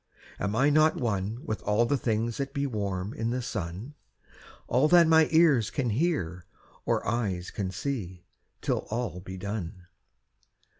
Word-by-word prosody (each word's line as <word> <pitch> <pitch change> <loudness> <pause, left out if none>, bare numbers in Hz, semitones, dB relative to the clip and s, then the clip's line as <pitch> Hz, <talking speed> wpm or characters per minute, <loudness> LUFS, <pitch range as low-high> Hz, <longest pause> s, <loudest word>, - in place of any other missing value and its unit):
Am 100 +2 -1
I 135 +5 +4
not 155 +1 +4
one 110 0 -2
with 110 -8 -3
all 105 +3 +2
the 140 - +1
things 115 -2 -1
that 140 0 -4
be 140 0 0
Warm 100 -5 -3
in 115 +1 -2
the 125 +2 -1
sun? 95 - -5 0.7
All 130 +5 +3
that 175 +1 +7
my 160 -1 +6
ears 155 -9 +4
can 125 -5 -1
hear, 105 - -1 0.4
or - - 0
eyes 100 -7 -1
can 100 -2 -3
see, 95 -4 -4 0.4
Till - - -1
all 110 -5 -3
be 95 +1 -8
done. 90 -2 -5
115 Hz, 155 wpm, -28 LUFS, 95-140 Hz, 0.7 s, that